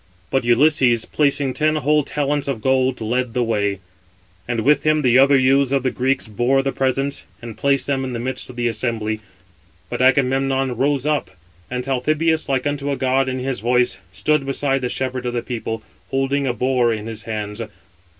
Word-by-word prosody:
But 135 - +1
Ulysses, 120 -1 +3
placing 140 -2 +1
633 155 +3 +1
ten 155 -1 0
whole 150 +2 +3
talents 145 0 -1
of 135 -5 -2
gold, 130 +1 +1
led 120 +2 -1
the 125 - +2
way, 100 -4 -1 0.7
and 120 -2 -1
with 145 +4 +3
him 155 -1 +2
the 125 0 +5
other 140 +1 +6
youths 135 +1 +3
of 135 -2 +1
the 130 - +1
Greeks 130 +1 0
bore 120 +6 +1
the 135 - 0
presents, 135 +1 -1
and 115 -2 -8
placed 140 -1 +1
them 135 -1 -1
in 130 -1 -4
the 120 - -3
midst 130 +2 -2
of 125 - -10
the 120 -1 0
assembly; 110 -1 -2 0.7
but 120 - -2
Agamemnon 135 0 +2
rose 140 +2 0
up; 150 -1 0 0.4
and 125 0 -3
Talthybius, 155 +5 0
like 130 -1 0
unto 145 0 -2
a 140 - -1
god 130 0 +1
in 130 - -3
his 130 -1 -3
voice, 125 +2 +1
stood 140 +10 +1
beside 135 0 0
the 125 - -2
shepherd 130 -1 -3
of 120 - -2
the 120 - -2
people, 115 -2 -4 0.3
holding 135 +1 0
a 125 - +1
boar 125 -1 +2
in 110 -1 -3
his 110 -1 -6
hands. 105 0 -4
130 Hz, 195 wpm, -20 LUFS, 120-140 Hz, 0.7 s, other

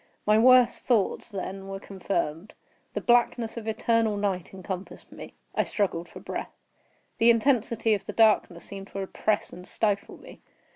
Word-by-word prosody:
My 215 +1 +4
worst 250 0 +5
thoughts, 235 -1 +1
then, 195 -1 -6
were 195 0 -5
confirmed. 190 -2 -3 0.4
The - - -2
blackness 240 -1 +2
of 225 -2 -7
eternal 220 -1 +1
night 195 -4 -2
encompassed 190 0 -7
me. - - -11 0.2
I - - +2
struggled 175 -5 -2
for - - -11
breath. - - -6 0.6
The 230 - +6
intensity 230 -2 +2
of 200 -2 -2
the - - -6
darkness 215 -6 +3
seemed 195 0 -8
to 195 - -7
oppress 205 +2 -1
and 180 +1 -10
stifle 205 -2 -1
me. - - -14
210 Hz, 155 wpm, -27 LUFS, 195-230 Hz, 0.6 s, The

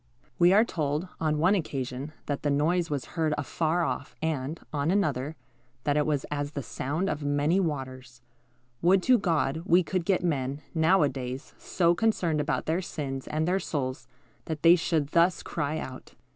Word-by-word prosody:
We 175 +1 +6
are 215 +4 +6
told, 155 -1 -2
on 155 -2 +1
one 175 +6 +4
occasion, 135 -5 -3
that 145 -1 -2
the 145 - 0
noise 165 +5 +1
was 145 -3 -2
heard 160 -3 +1
afar 160 +4 0
off, - - -3
and, 155 -1 -2
on 145 +1 0
another, 155 -6 0 0.5
that 145 - +1
it 150 0 +2
was 145 -3 0
as 145 0 -2
the 140 - -4
sound 150 +10 -2
of 150 -6 -2
many 145 +5 +2
waters. 130 -7 -4 0.6
Would 185 +2 +4
to 250 -2 +5
God 160 -5 0
we 180 0 +4
could 180 +2 -1
get 185 0 +1
men, 140 -3 -1
now 160 +2 +4
a 145 - +3
days, 130 +1 -6
so 170 -2 +2
concerned 175 -7 +1
about 145 - -1
their 165 +4 0
sins 135 -6 -5
and 155 +1 -1
their 185 +2 +2
souls, 140 -5 -3 0.4
that 155 -2 -5
they 170 +1 +8
should 160 -4 0
thus 170 +3 +3
cry 155 -1 -2
out. 130 -4 -8
155 Hz, 180 wpm, -28 LUFS, 140-175 Hz, 0.6 s, they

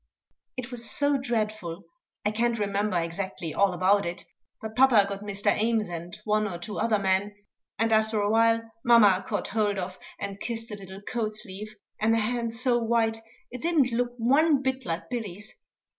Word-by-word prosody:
It 255 0 -5
was 235 -1 -6
so 285 0 +2
dreadful 215 -8 -2 0.4
I 210 - +2
can't 235 +2 +1
remember 200 -2 0
exactly 170 -1 -4
all 200 -1 +3
about 190 +3 +3
it; 170 +1 -5 0.3
but 220 0 -7
papa 250 -6 +6
got 200 0 -5
Mr. 205 -1 0
Ames 220 -2 +1
and 175 +4 -7
one 215 0 +2
or 180 -4 -5
two 175 +5 -5
other 225 -2 +2
men, 200 +1 0 0.4
and 225 +1 +1
after 220 0 +2
a 205 - +1
while 230 0 +4 0.2
mamma 215 -6 +6
caught 205 - -2
hold 205 -2 +1
of 185 0 -5 0.2
and 200 0 -5
kissed 230 -1 -4
a - - -4
little 195 -1 -10
coat 215 -1 -2
sleeve, 215 0 -7 0.2
and 225 +1 +3
a - - +2
hand 230 +1 -1
so 245 0 +2
white 225 -1 +1 0.3
it 250 0 -7
didn't 315 -7 +2
look 240 +1 0
one 275 +4 +3
bit 265 -2 -2
like 165 +1 -3
Billy's. 215 -2 -5
215 Hz, 180 wpm, -27 LUFS, 200-235 Hz, 0.4 s, papa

